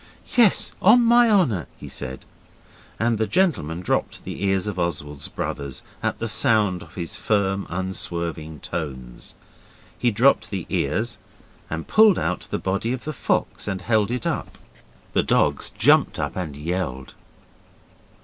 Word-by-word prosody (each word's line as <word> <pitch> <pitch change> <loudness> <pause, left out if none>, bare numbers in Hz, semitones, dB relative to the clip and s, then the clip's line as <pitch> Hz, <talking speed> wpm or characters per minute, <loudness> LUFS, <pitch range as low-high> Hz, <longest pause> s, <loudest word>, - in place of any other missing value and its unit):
'Yes, 235 -6 +4
on 235 +5 +7
my 235 0 +6
honour,' 145 - +2
he - - -9
said, 65 0 -7 0.7
and 115 -1 +1
the 110 - +1
gentleman 100 - +1
dropped 90 - -1
the - - -6
ears 95 -1 +1
of 105 -4 -3
Oswald's 75 -4 -3
brothers 70 -3 -5 0.2
at - - -1
the - - -3
sound 105 -6 +2
of 80 - -14
his 85 -3 -5
firm, 100 -2 0
unswerving 85 -4 -4
tones. 65 -5 -6 0.6
He 120 - +1
dropped 120 +5 +3
the 95 -4 -4
ears 110 - -1 0.5
and 80 0 -4
pulled 215 -4 +6
out - - -2
the - - -1
body 100 +5 -1
of 130 - -5
the 155 - -4
fox 125 - -1
and 95 -2 -3
held 110 -2 +2
it 125 -1 -3
up. - - -3 0.6
The - - +4
dogs - - +1
jumped - - +3
up - - -3
and 80 -6 -4
yelled. 75 -5 -3
95 Hz, 150 wpm, -23 LUFS, 80-120 Hz, 0.7 s, on